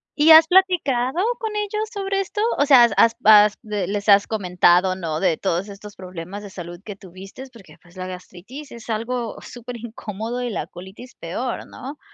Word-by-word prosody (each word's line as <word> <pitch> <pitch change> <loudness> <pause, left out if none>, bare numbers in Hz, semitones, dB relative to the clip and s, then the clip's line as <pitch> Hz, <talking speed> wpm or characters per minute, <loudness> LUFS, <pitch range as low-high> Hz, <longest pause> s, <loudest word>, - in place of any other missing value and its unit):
¿Y 310 +2 +5
has 320 0 +9
platicado 340 -6 +2 0.2
con 440 -2 -4
ellos 425 +1 -3
sobre 390 -1 -2
esto, 405 +2 -4 0.2
o 285 - +2
sea, 270 -4 +7
has 235 - +3
has 230 0 +4
bas 210 -2 +6
de 210 -5 -4
les 205 +1 -3
has 200 0 +6
comentado, 180 -2 +2
no, 165 -4 -4
de 165 -4 +1
todos 190 +1 -2
estos 205 +1 -11
problemas 185 +1 -9
de 205 - -10
salud 175 -2 -9
que 205 -2 -8
tuviste?, 195 +5 -12
porque, 220 -6 -16
pues, 175 +1 -21
la 185 0 -5
gastritis 185 +10 -11
es 235 0 -12
algo 230 +1 -3
superincómodo 235 -1 -7
y 245 - -3
la 210 - -4
colitis 190 +8 -12
peor, 235 +9 -5
¿no?, 275 +3 -10
215 Hz, 185 wpm, -21 LUFS, 190-260 Hz, 0.2 s, has